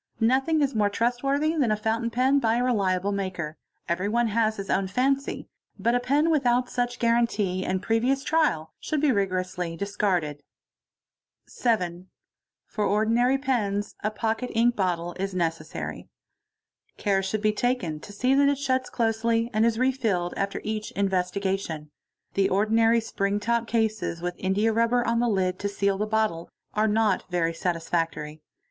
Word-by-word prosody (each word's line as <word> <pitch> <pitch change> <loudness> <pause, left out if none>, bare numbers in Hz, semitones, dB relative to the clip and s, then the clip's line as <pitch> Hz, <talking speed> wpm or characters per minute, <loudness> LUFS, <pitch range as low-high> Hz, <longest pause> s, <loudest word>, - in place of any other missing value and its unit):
Nothing 270 +7 +2
is 275 - 0
more 210 -2 +2
trust 240 +4 0
worthy 285 +3 +1
than 275 -7 +2
a - - +3
fountain 225 +2 -1
pen 260 +4 +3
by 225 -3 +2
a 245 - +1
reliable 200 -5 +1
maker—everyone 190 +4 -2
has 220 0 +1
his 195 -1 -5
own 190 0 +1
faney—but 260 0 -2
a 245 - +3
pen 285 +6 +2
without 250 -4 +2
such 245 0 -1
guarantee 230 -6 +1
and 185 0 -2
previous 250 +5 +1
trial 165 - +1
should 305 - -2
be 295 -1 +3
rigorously 185 -4 -1
discarded.; 180 -7 -1 0.5
| - - -65
7. 185 -7 -1 0.6
For 210 - -3
ordinary 230 +6 +2
pens 210 -7 -1
a 215 - +1
pocket 225 +3 -2
ink 235 +1 +3
bottle 175 -3 -1
is 195 0 -3
necessary. 165 -2 -3 0.9
Care 195 -2 +1
should 200 +3 -3
be 215 0 +3
taken 210 -10 -1
to 205 - -11
see 250 +6 +1
that 280 +1 +5
it 285 - +1
shuts 260 -2 0
closely 230 0 0
and 220 +2 +3
is 225 -1 0
re 255 +2 +3
filled 200 -9 -1
after 200 0 -2
each 215 0 -3
investiga 195 0 0
tion. 155 -5 -7 0.4
The 195 -1 +2
ordinary 225 +4 +3
spring 200 -2 -1
top 235 +2 0
cases 220 -6 -1
with 175 +1 -3
indiarubber 225 +5 +2
on 230 0 +1
the 240 - +2
hd 185 -4 0
te 200 - -1
seal 200 -1 0
the 210 - 0
bottle 215 -6 0 0.2
are 215 +1 +2
not 215 -2 +1
very 170 -2 0
satisfactory. 165 -3 -2
215 Hz, 160 wpm, -26 LUFS, 190-240 Hz, 0.9 s, that